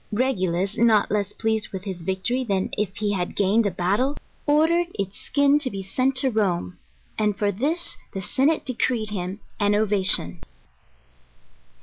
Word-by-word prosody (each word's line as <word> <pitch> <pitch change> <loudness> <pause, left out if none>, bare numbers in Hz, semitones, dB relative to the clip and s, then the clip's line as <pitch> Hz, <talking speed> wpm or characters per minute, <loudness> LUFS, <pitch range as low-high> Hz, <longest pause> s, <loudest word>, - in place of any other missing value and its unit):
Regulus, 195 -5 -1
not 225 -3 +3
less 205 -1 0
pleased 220 -1 -2
with 190 -1 -7
his 190 -4 -6
victory 190 +9 -1
than 195 -5 -1
if 200 -2 -2
he 210 -1 -1
had 180 -2 -3
gained 205 +2 +2
a - - +1
battle, 200 - 0 0.3
ordered 325 +4 +3
its 195 0 -4
skin 285 0 +2
to 280 -3 +1
be 195 -4 -6
sent 255 +7 0
to 260 0 +2
Rome, 180 - -1 0.4
and 210 -2 +1
for 205 -1 +1
this 300 - +2
the 195 - -5
senate 275 - +1
decreed 235 -3 0
him 190 0 -4 0.2
an 205 0 +2
ovation. 195 - +2
210 Hz, 155 wpm, -23 LUFS, 190-255 Hz, 0.4 s, not